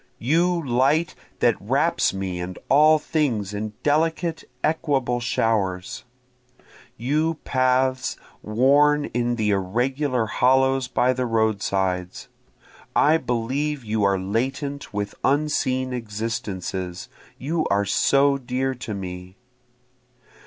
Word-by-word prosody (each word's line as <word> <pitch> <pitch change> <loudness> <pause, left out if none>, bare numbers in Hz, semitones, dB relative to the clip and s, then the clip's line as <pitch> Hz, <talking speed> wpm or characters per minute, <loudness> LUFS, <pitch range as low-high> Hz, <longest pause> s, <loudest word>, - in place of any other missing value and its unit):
You 170 +7 +2
light 135 +7 +2 0.3
that - - +2
wraps - - +1
me 95 -2 -4
and 90 +1 -5
all 155 +3 +6
things 125 - -1
in 105 +1 -4
delicate 160 +2 0 0.2
equable 140 -6 0
showers! 100 -6 -1 0.9
You 155 +7 0
paths 130 0 +1 0.2
worn 145 +6 +3
in 120 0 0
the 110 -2 0
irregular 125 +6 0
hollows 130 +2 +2
by 125 +1 +2
the 125 0 -2
roadsides! 100 -5 -1 0.7
I 155 +2 +5
believe 130 +2 -2
you 110 0 -1
are 100 -1 +3
latent 130 +9 -3
with 105 0 -3
unseen 130 -3 +1
existences, 105 -5 -4 0.3
you 155 +4 -1
are 100 +1 +2
so 140 +6 +3
dear 130 +1 -2
to 120 -4 -6
me. 90 -1 -7
125 Hz, 105 wpm, -23 LUFS, 105-140 Hz, 0.9 s, all